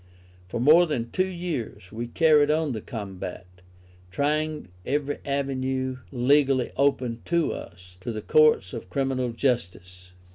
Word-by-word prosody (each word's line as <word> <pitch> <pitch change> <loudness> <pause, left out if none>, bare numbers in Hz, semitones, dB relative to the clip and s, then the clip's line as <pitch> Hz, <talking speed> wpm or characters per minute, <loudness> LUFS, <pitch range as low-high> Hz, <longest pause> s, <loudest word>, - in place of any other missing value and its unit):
For 115 - -4
more 160 +8 +6
than 120 -6 -3
two 185 0 +1
years 170 - -5
we 115 +2 -4
carried 150 +1 +4
on 155 -1 +1
the 110 -3 -4
combat, 95 -6 -7 0.6
trying 150 +1 -1
every 145 +3 -1
avenue 130 -2 -2
legally 135 0 +3
open 125 -4 +1
to 170 -1 +1
us, 90 +1 -11
to 105 +6 -5
the 110 -2 -5
Courts 155 -12 +4
of 90 - -7
Criminal 135 -1 -1
Justice. 90 -7 -3
130 Hz, 135 wpm, -26 LUFS, 115-150 Hz, 0.6 s, more